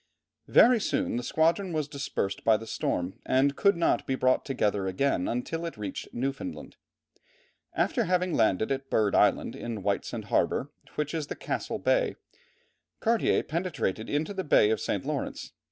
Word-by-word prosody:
Very 245 -1 +6
soon 195 - -1
the - - -1
squadron 165 +7 +1
was 155 -2 -1
dispersed 135 -9 -3
by 110 -1 +5
the 115 - -9
storm, 90 -4 -2
and 140 +2 +2
could 200 -3 +3
not 170 - +1
be 135 - +1
brought 130 0 +2
together 105 -7 0
again 95 0 0
until 145 +8 -3
it 165 -7 -5
reached 105 -1 -5
Newfoundland. 135 - -4 1.0
After 235 -4 +1
having 180 0 +1
landed 110 +1 +2
at 135 0 -3
Bird 105 -3 +2
Island, - - +3
in 115 -4 -5
Whitesand 100 0 -2
harbour, 140 - +1 0.2
which 150 +1 -2
is 155 -3 -2
in - - -6
Castle - - -3
Bay, - - +1 0.8
Cartier 230 -1 +2
penetrated 155 - -2
into 155 +6 -1
the 190 -1 -3
Bay 110 -8 +4
of 110 - 0
St. - - -2
Lawrence. - - -4
140 Hz, 160 wpm, -28 LUFS, 110-170 Hz, 1.0 s, Very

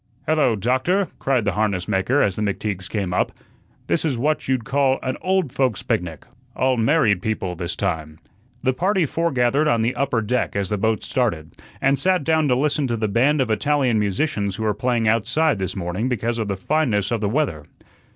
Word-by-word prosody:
"Hello, 150 -6 +2
Doctor," 130 - +1
cried 130 -5 +1
the 100 - +2
harness 100 -2 -1
maker 105 +7 +2
as 100 -3 0
the - - -4
McTeagues 100 -2 -2
came 100 -4 -2
up. - - +1 0.5
"This 170 - 0
is 145 -6 0
what 150 +5 0
you'd 130 -3 0
call 135 0 +2
an 130 0 -2
old 185 -6 0
folks' 120 -8 0
picnic, 85 -4 -2 0.3
all 130 +1 +2
married 115 - +2
people 95 -4 -2
this 90 0 -3
time." 80 -1 -3 0.5
The 130 - +2
party 185 +5 +1
foregathered 145 -2 +1
on 115 -5 +2
the 120 +3 +1
upper 135 -4 0
deck 125 +1 -1
as 100 -2 -1
the 105 - +1
boat 110 +1 0
started, 100 -12 -1 0.3
and 135 0 +2
sat 185 +1 +2
down 160 0 +2
to 125 - +3
listen 140 +1 +1
to 120 -2 -1
the 110 -1 0
band 135 +8 +2
of 125 - 0
Italian 130 0 +1
musicians 100 -1 -1
who 110 - -4
were 105 -1 +1
playing 120 0 0
outside 115 +5 +2
this 95 -2 -3
morning 95 +6 -2
because 120 -1 -1
of 110 - -2
the 100 - -1
fineness 115 -4 0
of 115 -2 0
the 105 - 0
weather. 115 - -1
120 Hz, 200 wpm, -22 LUFS, 100-140 Hz, 0.5 s, to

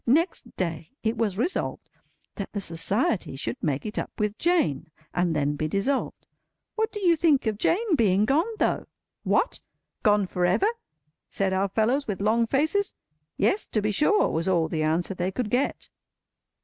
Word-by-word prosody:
Next 305 -1 +1
day, 165 -3 -3
it 225 +1 0
was 215 -4 -1
resolved 320 - -2 0.5
that 200 - -6
the 205 - -2
Society 190 - 0
should 120 -3 -4
make 145 +2 -1
it 215 - -3
up - - -4
with 210 -1 -1
Jane, 285 - +1 0.2
and 175 -2 +1
then 145 0 0
be 155 +1 -2
dissolved. 220 - -1 0.5
What 440 0 -1
do 415 - -5
you 345 -3 +5
think 305 -5 +3
of 215 -2 -1
Jane 395 - +2
being 205 -5 +3
gone, 305 - +2
though! - - 0 0.3
"What? - - +1 0.4
Gone 205 -1 +3
for 180 -1 -3
ever?" 190 - +3 0.6
said 195 -1 0
our 190 +1 +1
fellows, 230 +8 +1
with 205 -3 -3
long 225 +3 +2
faces. 315 - +1 0.4
"Yes, 410 - +2
to 215 - 0
be 210 0 0
sure," 355 - +3
was 165 +2 -1
all 170 -4 +2
the 160 -1 -2
answer 165 +5 0
they 180 0 -2
could 220 +1 -3
get. 255 +3 0
210 Hz, 175 wpm, -26 LUFS, 180-280 Hz, 0.6 s, you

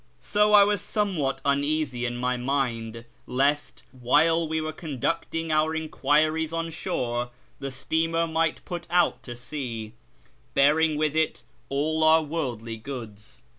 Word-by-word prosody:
So 210 0 +2
I 205 -1 +9
was 205 -1 +1
somewhat 185 -11 -1
un 140 0 +2
easy 145 -5 -1
in 120 0 -4
my 125 +1 0
mind 120 -3 -2 0.2
lest, 140 +3 0
while 160 +6 +2
we 160 +1 -1
were 155 0 -3
conducting 165 +2 -3
our 155 +1 +2
enquiries 155 0 +1
ou 165 0 -3
shore, 125 -8 -2 0.3
the 135 - -4
steamer 160 +5 0
might 165 0 -1
put 175 -1 -6
out 175 0 +2
to 120 - -8
sea, 120 -4 -6 0.6
bearing 150 +2 +4
with 155 0 0
it 160 0 0 0.3
all 155 +3 0
our 160 0 +6
worldly 125 -8 -4
goods. 110 -4 -9
150 Hz, 140 wpm, -26 LUFS, 125-160 Hz, 0.6 s, I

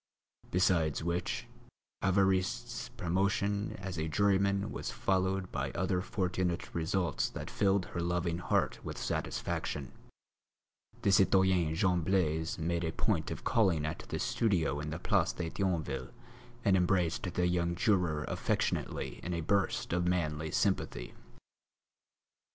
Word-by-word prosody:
Besides 85 -4 +2
which, 85 +7 -2 0.6
Évariste's 95 -1 +1
promotion 100 +3 0
as 95 -3 -5
a 80 - -1
juryman 100 +2 +2
was - - -4
followed 95 0 0
by - - -2
other 95 0 0
fortunate 90 -4 -2
results 85 +2 0
that - - -7
filled 100 -2 +2
her 85 - -5
loving 85 0 0
heart 90 - 0
with - - -5
satisfaction; 70 -4 -3 1.1
the 100 - +4
citoyen 95 -4 +4
Jean 90 -1 +2
Blaise 80 -3 +1
made 85 +1 -1
a 80 - -1
point - - 0
of - - -6
calling 90 -9 +2
at 75 - -3
the - - -2
studio 85 -11 +1
in 75 +1 -4
the 75 - -3
Place - - +1
de 80 -2 -4
Thionville 85 -8 -1 0.6
and 100 -2 +5
embraced 90 -1 +1
the 90 +1 +1
young 85 -1 +1
juror 90 -7 +1
affectionately - - -1
in 90 0 -3
a 85 - -2
burst 100 0 0
of 90 0 +1
manly 80 -3 0
sympathy. 85 - 0
90 Hz, 130 wpm, -32 LUFS, 85-95 Hz, 1.1 s, and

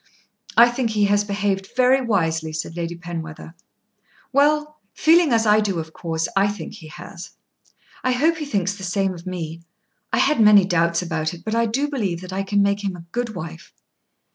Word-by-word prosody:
"I 235 +1 +8
think 240 -1 -1
he 210 -2 +2
has 205 +1 +2
behaved 200 -1 -2
very 255 +1 +4
wisely," 165 -8 0
said 155 +1 -5
Lady 170 0 -4
Penwether. 165 -2 -7 0.8
"Well; 300 +2 +2 0.2
feeling 325 -1 +4
as 225 -1 +3
I 210 0 +5
do 205 -4 -1
of 160 -1 -5
course 165 -1 -2
I 195 +1 +4
think 205 0 -6
he 160 - -11
has. 170 +2 -10 0.7
I 255 - +2
hope 315 +6 +2
he 305 - -4
thinks 200 -8 -1
the 200 -1 -10
same 190 +1 0
of 170 0 -11
me. 165 -2 -5 0.5
I - - +1
had 280 -5 +3
many 210 -3 +7
doubts 170 -1 +1
about 165 -1 -2
it, 170 - -16
but 220 - -2
I 230 0 +2
do 270 +7 0
believe 205 - -2
that 185 0 -8
I 195 - -1
can 200 +1 +1
make 200 +1 0
him 195 -2 -2
a 170 -1 -11
good 235 -2 -3
wife." 165 -1 -8
200 Hz, 195 wpm, -22 LUFS, 170-230 Hz, 0.8 s, I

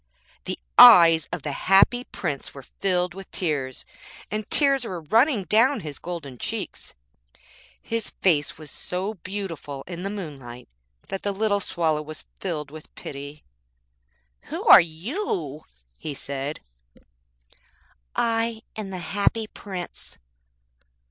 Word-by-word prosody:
The - - -3 0.2
eyes 165 -3 +9
of 175 -4 -4
the 150 - -3
Happy 195 - +4
Prince 145 -7 -5
were 140 - -9
filled 180 +3 -1
with 195 0 -10
tears, 140 -7 -2 0.5
and 215 0 -3
tears 275 -3 +4
were 185 -7 -5
running 225 - +3
down 230 - +3
his 150 -3 -7
golden 150 -8 -7
cheeks. - - -5 0.8
His 230 -1 -3
face 155 -6 +1
was 155 -3 -11
so 190 +4 -4
beautiful 175 -8 -6
in 175 -1 -7
the 195 - -3
moonlight 140 -11 -8 0.4
that 195 - -4
the 205 - -1
little 205 0 +1
Swallow 160 -5 0
was 155 +1 -9
filled 150 -6 -4
with 155 0 -12
pity. 145 +1 -8 1.0
'Who - - -5
are - - +10
you?' 165 - -4 0.3
he 150 -2 -5
said. 140 +2 -4 1.5
'I 225 -1 0
am 215 -3 -5
the 190 - -5
Happy 205 +5 0
Prince.' 190 -4 -8
180 Hz, 125 wpm, -25 LUFS, 150-205 Hz, 1.5 s, are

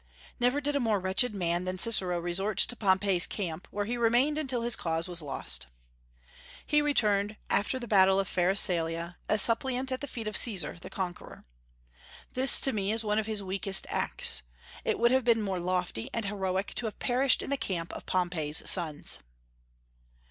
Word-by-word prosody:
Never 250 +3 +1
did 290 0 -2
a - - +1
more 220 -5 0
wretched 190 +5 +1
man 175 -2 -1
than 185 0 -4
Cicero 185 -4 +4
resort 175 +4 -1
to 245 - +2
Pompey's 190 -3 +3
camp, 180 -3 -5
where 205 0 -3
he 240 +3 -3
remained 240 +6 +2
until 255 -5 -2
his 235 -1 +3
cause 165 0 -2
was 175 -2 +1
lost. 65 - -2 1.0
He 300 0 +2
returned, 210 -8 0 0.2
after 210 +6 +1
the 240 -2 -7
battle 195 -2 +4
of 195 - -1
Pharsalia, 175 -2 0
a 215 - +2
suppliant 250 +4 +1
at 255 - -3
the 285 - -5
feet 230 -4 -7
of 215 - -4
Caesar, 180 -8 +1
the - - -9
conqueror. 180 -2 -7 0.9
This, 260 +1 +6
to 270 - +2
me, 200 -1 -2
is 225 +1 0
one 210 0 0
of 220 - -4
his 215 -2 -2
weakest 195 0 -1
acts. - - +2 0.4
It - - -1
would 235 +1 +3
have 260 0 +2
been 230 -2 +2
more 190 -3 -3
lofty 180 -9 -3
and 230 -2 -2
heroic 190 -1 -3
to 235 - -1
have 215 - -8
perished 255 +1 +1
in - - -7
the - - +2
camp 185 -9 -4
of - - -9
Pompey's 175 -4 -1
sons. 160 -5 +3
200 Hz, 185 wpm, -28 LUFS, 180-235 Hz, 1.0 s, This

